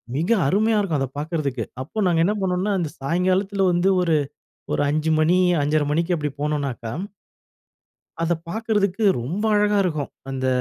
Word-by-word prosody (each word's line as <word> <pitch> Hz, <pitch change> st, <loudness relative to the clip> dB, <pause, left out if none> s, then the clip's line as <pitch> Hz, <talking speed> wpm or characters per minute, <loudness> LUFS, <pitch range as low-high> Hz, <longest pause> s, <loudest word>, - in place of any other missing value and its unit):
மிக 165 Hz, +8 st, -1 dB, 0.2 s
அருமையா 215 Hz, +7 st, +2 dB
இருக்கும் 175 Hz, -8 st, 0 dB
அத 135 Hz, -, -1 dB
பார்க்கறதுக்கு. 150 Hz, -3 st, -2 dB, 0.2 s
அப்ப 190 Hz, +11 st, -4 dB
நாங்க 165 Hz, -2 st, +3 dB
என்ன 205 Hz, -, +2 dB
பண்ணோன்னா, 185 Hz, +2 st, 0 dB
அந்த 165 Hz, -4 st, -2 dB
சாயங்காலத்துல 185 Hz, +7 st, +1 dB
வந்து, 175 Hz, +2 st, +2 dB
ஒரு 165 Hz, -3 st, +2 dB, 0.6 s
ஒரு -, -, +1 dB
5:00 155 Hz, +2 st, 0 dB
மணி 165 Hz, +3 st, +3 dB, 0.3 s
5:30 150 Hz, +1 st, +1 dB
மணிக்கு 170 Hz, +4 st, +1 dB
அப்டி 150 Hz, -2 st, -2 dB
போனோனக்கா, 140 Hz, -6 st, -2 dB, 1.3 s
அத 170 Hz, +1 st, +1 dB
பார்க்கறதுக்கு 215 Hz, -1 st, 0 dB, 0.2 s
ரொம்ப 170 Hz, -, -3 dB
அழகா 210 Hz, 0 st, +3 dB
இருக்கும். 155 Hz, -6 st, -2 dB, 0.2 s
அந்த 130 Hz, -1 st, -2 dB
170 Hz, 145 wpm, -22 LUFS, 150-195 Hz, 1.3 s, நாங்க